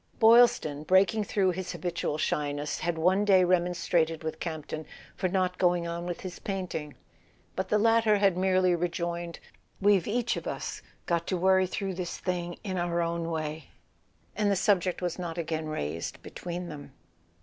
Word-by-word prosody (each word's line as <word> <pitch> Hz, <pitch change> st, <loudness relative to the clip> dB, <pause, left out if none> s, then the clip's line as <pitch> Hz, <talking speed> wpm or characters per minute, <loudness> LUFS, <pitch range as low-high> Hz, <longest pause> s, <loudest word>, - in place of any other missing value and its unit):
Boylston, 230 Hz, -, +5 dB
breaking 190 Hz, +5 st, +3 dB
through 195 Hz, -2 st, +2 dB
his 185 Hz, +1 st, -4 dB
habitual 170 Hz, -3 st, -2 dB
shyness, 145 Hz, -1 st, -1 dB
had 170 Hz, 0 st, -1 dB
one 185 Hz, +5 st, +3 dB
day 190 Hz, -3 st, +5 dB
remonstrated 175 Hz, -2 st, +1 dB
with 160 Hz, -, -4 dB
Campton 155 Hz, -1 st, -5 dB, 0.3 s
for 185 Hz, -, 0 dB
not 185 Hz, -1 st, 0 dB
going 175 Hz, -1 st, +2 dB
on 170 Hz, +1 st, -4 dB
wdth 175 Hz, -, -4 dB
his 185 Hz, -2 st, -7 dB
painting: 180 Hz, -7 st, -4 dB, 0.6 s
but 190 Hz, 0 st, -2 dB
the 210 Hz, -, +3 dB
latter 225 Hz, -1 st, +4 dB
had 195 Hz, -3 st, +3 dB
merely 185 Hz, 0 st, +3 dB
re¬ 175 Hz, +1 st, 0 dB
joined: 170 Hz, 0 st, -4 dB, 0.2 s
" -, -, -39 dB
We've 200 Hz, -3 st, +3 dB
each 240 Hz, +2 st, 0 dB
of -, -, -6 dB
us -, -, -4 dB, 0.2 s
got 170 Hz, -1 st, 0 dB
to 185 Hz, -, 0 dB
worry 190 Hz, +1 st, +4 dB
through 195 Hz, +1 st, -3 dB
this 180 Hz, -1 st, -4 dB
thing 175 Hz, -1 st, -3 dB
in 190 Hz, -4 st, -2 dB
our 175 Hz, 0 st, 0 dB
own 170 Hz, 0 st, -1 dB
way—" 155 Hz, -2 st, -4 dB, 0.7 s
and 210 Hz, 0 st, +1 dB
the 200 Hz, -, +3 dB
subject 185 Hz, -2 st, +1 dB
was 175 Hz, 0 st, -2 dB
not 175 Hz, -1 st, -4 dB
again 160 Hz, -1 st, -2 dB
raised 85 Hz, -, -4 dB
between 175 Hz, 0 st, -6 dB
them. 145 Hz, -4 st, -9 dB
175 Hz, 170 wpm, -28 LUFS, 165-190 Hz, 0.7 s, Boylston